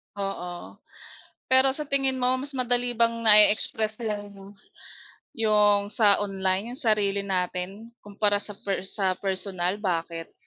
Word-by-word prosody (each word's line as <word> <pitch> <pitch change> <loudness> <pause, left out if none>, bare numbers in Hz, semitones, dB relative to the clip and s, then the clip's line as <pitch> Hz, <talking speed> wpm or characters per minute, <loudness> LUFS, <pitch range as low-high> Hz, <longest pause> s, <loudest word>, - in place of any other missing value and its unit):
Oo, 180 -3 -7 0.7
pero 265 0 +5
sa 300 - -4
tingin 270 -2 +1
mo 255 +1 +2
mas 280 +1 -8
madali 245 -1 0
bang 230 0 +2
na-e-express 215 +1 +5
iyong 205 -2 -7 0.8
yong 210 -2 +2
sa 210 -4 +4
online 195 +2 -2
'yong 255 - -9
sarili 205 -3 0
natin 190 +3 -4
kumpara 205 0 -1
sa 210 0 -10
per 195 -1 -3
sa 190 -3 -1
personal, 190 -1 -3
bakit? 165 -4 -4
205 Hz, 125 wpm, -25 LUFS, 195-230 Hz, 0.8 s, pero